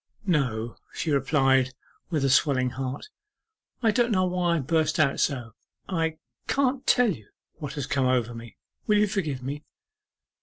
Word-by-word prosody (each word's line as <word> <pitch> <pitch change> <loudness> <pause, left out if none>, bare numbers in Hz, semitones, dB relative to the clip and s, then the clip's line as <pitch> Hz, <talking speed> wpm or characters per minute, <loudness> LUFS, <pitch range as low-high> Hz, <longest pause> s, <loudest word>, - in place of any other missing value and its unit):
'No,' 125 - 0
she 160 - -2
replied, 135 -2 +2 0.3
with 155 -5 0
a - - +2
swelling 130 -3 +3
heart; 130 - -5 0.7
'I 225 - +5
don't 240 +2 +2
know 185 -3 +3
why 180 -1 +1
I - - +1
burst 160 +3 +1
out 140 -3 +3
so 120 -5 -1 0.3
I 165 -3 -1 0.3
can't 270 -1 0
tell 245 -5 +4 0.5
what 145 -2 -5
has 145 -3 -3
come 135 -2 +1
over 120 -2 +1
me! 115 -2 -10 0.3
Will 210 - +4
you 210 - +5
forgive 155 -10 -2
me? 145 +3 -5
145 Hz, 155 wpm, -26 LUFS, 130-180 Hz, 0.7 s, I